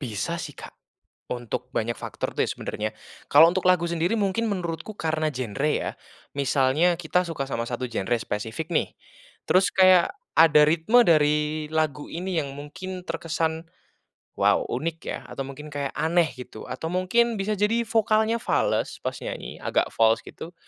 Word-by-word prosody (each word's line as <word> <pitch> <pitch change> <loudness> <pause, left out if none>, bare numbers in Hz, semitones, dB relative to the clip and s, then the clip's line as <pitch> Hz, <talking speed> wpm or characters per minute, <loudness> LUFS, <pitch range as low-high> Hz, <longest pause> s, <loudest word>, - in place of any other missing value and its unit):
Bisa 110 -9 -3
sih, - - -6
Kak, - - -11 0.6
untuk 125 +1 -5
banyak 115 +1 -1
faktor - - -5
tuh - - +3
ya - - -3
sebenernya. 110 +1 -4 0.4
Kalau 155 +3 +9
untuk 180 +2 -1
lagu 180 -2 +3
sendiri 170 +3 0
mungkin 210 0 0
menurutku 170 +1 -4
karena 155 -4 -1
genre 130 +2 -2
ya. - - -1 0.5
Misalnya 140 +5 +2
kita 180 +2 +1
suka 150 -5 -4
sama 115 -3 -2
satu 125 +1 -4
genre 120 +1 -1
spesifik 115 +11 -4
nih, 165 - 0 0.6
terus 185 +1 +4
kayak 185 - +5 0.2
ada 150 -2 +7
ritme 170 +10 +4
dari 150 -1 +2
lagu 155 -2 -1
ini 180 +2 -3
yang 140 -2 -5
mungkin 180 +6 -7
terkesan, 165 0 -2 0.7
“Wow - - +2
unik 160 +6 -2
ya,” - - -2
atau - - -7
mungkin 140 +3 -9
kayak 140 -1 -3
aneh 170 0 +2
gitu. 125 -3 -9
Atau 160 +2 -4
mungkin 230 +6 +2
bisa 210 +2 -1
jadi 210 +4 +2
vokalnya 220 0 +2
fales - - 0
pas - - -3
nyanyi, - - -6
agak - - 0
fals 115 0 +3
gitu. 170 - -10
160 Hz, 160 wpm, -25 LUFS, 140-180 Hz, 0.7 s, Kalau